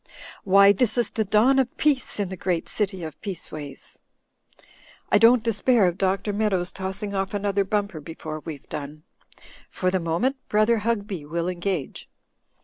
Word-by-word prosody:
Why, 200 +1 +6
this 220 +3 +1
is 240 - +1
the 220 - -1
dawn 220 +7 +4
of 260 -1 -1
peace 285 -7 +1
in 200 -3 -1
the 190 - -5
great 175 -2 -2
city 195 -4 -2
of 155 -2 -8
Peaceways. 155 -7 -7 1.1
I - - +5
don't 230 +1 +6
despair 230 0 +3
of 175 +2 -2
Dr. 195 +2 0
Meadows 195 -4 0
tossing 195 +2 -4
off 195 +1 -2
another 200 -1 0
bumper 200 -4 -2
before 155 0 -7
we've 150 -3 -9
done. 150 +1 -7 0.7
For 185 0 -1
the 190 - +1
moment. 175 +12 0
Brother 215 +2 +3
Hugby 205 -6 -2
will 165 +3 -3
engage." 180 -4 -3
195 Hz, 155 wpm, -24 LUFS, 175-215 Hz, 1.1 s, Why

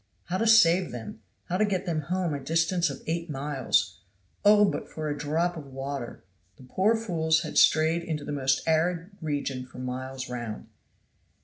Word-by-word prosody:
How 185 +2 -1
to 230 - +1
save 185 -5 +6
them; 110 -2 -8 0.2
how 180 - -2
to 215 - +3
get 195 -2 -1
them 165 -4 -1
home 175 +2 -1
a 145 - -3
distance 165 +4 +1
of 135 - -8
eight 165 +1 -3
miles. 135 -8 0 0.4
"Oh! 205 0 +5
for 155 -1 -5
a 145 - -1
drop 160 +4 -1
of 155 -4 -8
water." 135 -1 -6 0.3
The - - -15
poor 190 - +2
fools 160 -8 +1
had 155 - -6
strayed 160 +2 +4
into 155 -3 -4
the - - -5
most 135 0 0
arid 165 +3 +1
region 140 -4 -2
for 130 - -14
miles 130 +1 -5
round. 120 -3 -6
155 Hz, 175 wpm, -27 LUFS, 135-175 Hz, 0.4 s, save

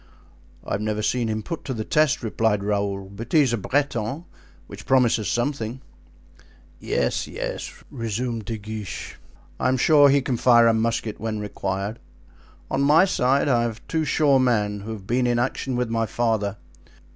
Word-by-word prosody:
"I - - -8
have 100 - -1
never 105 0 -2
seen 120 +1 0
him 110 0 -2
put 165 - -5
to 130 - -3
the 110 - -3
test," 155 -4 +2
replied 110 -2 0
Raoul, 100 -1 -1
"but 105 +4 -9
he 155 - +7
is 130 -5 +2
a - - +1
Breton, 135 - -1 0.4
which - - -11
promises 120 -5 +3
something." 120 - -2 1.0
"Yes, - - -1
yes," - - -5 0.2
resumed 115 -1 -3
De 115 -2 -4
Guiche; 105 -4 -7 0.4
"I - - +1
am 130 0 +2
sure 145 +2 +6
he 140 0 +3
can 125 -2 -1
fire 120 -1 +5
a 115 - +5
musket 110 -1 -1
when 110 -1 -3
required. 100 +1 -4 0.7
On 135 - +1
my 150 +6 +6
side 140 -7 +2
I 120 -4 +3
have 115 -2 -4
two 160 -1 0
sure 145 -3 +3
men, 105 -5 +1
who 105 +3 -7
have 105 -4 -7
been 125 +3 +1
in 120 -1 +1
action 125 +1 -1
with 120 -2 -1
my 115 -1 0
father. 110 -3 -1
115 Hz, 175 wpm, -24 LUFS, 105-130 Hz, 1.0 s, he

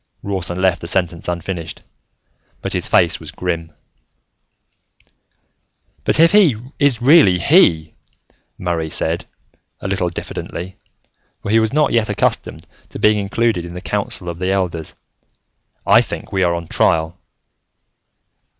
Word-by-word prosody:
Rawson 90 -3 -3
left 95 -2 +1
the 85 - -6
sentence 85 -2 -1
unfinished, 85 -1 -5 0.8
but - - -2
his - - -1
face 85 -1 +3
was 80 - -10
grim. 85 -2 -4 2.3
"But - - +2
if 165 +1 +6
he 195 - +5 0.2
is 135 -5 +2
really 135 - +6
He," 85 - +3 0.6
Murray 85 -3 -2
said, - - -2 0.5
a - - -5
little 95 -2 0
diffidently, 90 +1 -7 0.7
for 100 - -3
he 115 - +5
was 110 -1 +1
not 150 +1 +2
yet 115 -2 +2
accustomed - - -1 0.2
to - - -8
being 105 0 +3
included 100 -1 0
in 85 0 -9
the - - -5
council 90 - -3
of 85 -1 -5
the 90 0 -1
elders, 90 -5 -2 0.9
"I - - +6
think - - -6
we 95 - 0
are 85 -1 +2
on 85 0 -5
trial." 80 +2 +1
90 Hz, 135 wpm, -18 LUFS, 85-105 Hz, 2.3 s, if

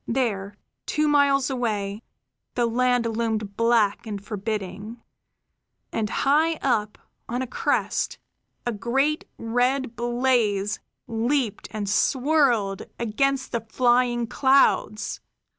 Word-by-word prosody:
There, 210 -5 -1 0.3
two 305 0 +1
miles 280 -2 +3
away, 210 -5 -2 0.5
the 240 - +2
land 245 +1 +2
loomed 220 -3 -2
black 230 -2 +2
and 205 -2 -4
forbidding; 210 +1 -5 0.9
and 215 -2 -1
high 310 +7 +2
up, 220 -8 0 0.3
on 245 +2 -1
a - - -2
crest, 255 - -1 0.5
a 240 - 0
great 270 +8 0
red 245 +2 0
blaze 235 -4 +1 0.3
leaped 235 0 -1
and 210 -2 -4
swirled 245 -3 +2 0.2
against 270 +4 0
the 235 - -1
flying 240 +1 +2
clouds. 250 -4 +2
235 Hz, 105 wpm, -24 LUFS, 210-260 Hz, 0.9 s, miles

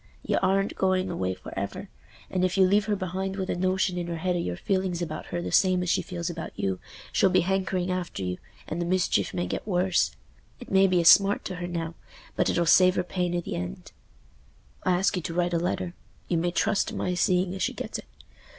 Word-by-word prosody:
Y'aren't 195 +1 +1
going 185 -1 +1
away 95 - -2
for - - -10
ever, - - -4 0.4
and 185 -1 0
if 185 +1 +1
you 190 - +6
leave 205 +2 +3
her 210 - +1
behind 190 0 -3
with 190 -1 -2
a - - -1
notion 185 0 0
in 175 - -3
her 170 - -3
head 180 +2 0
o' - - 0
your 90 - -2
feeling 190 -2 -1
about 155 -2 -5
her 175 0 -3
the - - -4
same 185 -1 +4
as 180 - 0
she - - +2
feels 170 -2 -5
about 165 -2 -5
you, 95 -2 -1 0.3
she'll 190 - +4
be - - +4
hankering 185 0 0
after 180 - -3
you, 90 0 -3 0.3
and 170 - -3
the - - -1
mischief 185 0 +1
may 175 0 -2
get - - -4
worse. 185 -2 +1 0.4
It 245 - -11
may 195 0 +5
be 180 -2 +3
a - - -3
smart 200 +3 +6
to 185 - -4
her 175 -1 -4
now, 170 -2 -3 0.4
but - - +2
it'll 175 - +1
save 185 +3 +6
her 180 - +1
pain 180 -1 -2
i' - - -1
th' - - -10
end. 90 -8 -5 0.9
I 185 - +2
ask 190 +3 +2
you 180 - -1
to 165 0 -5
write 175 0 +1
a 170 - +2
letter—you 175 0 -4
may 175 +1 +1
trust 200 +4 +1
to - - -5
my 180 - -1
seeing 180 +1 +2
as 190 - -6
she - - 0
gets - - -5
it. - - -11
180 Hz, 230 wpm, -27 LUFS, 175-190 Hz, 0.9 s, you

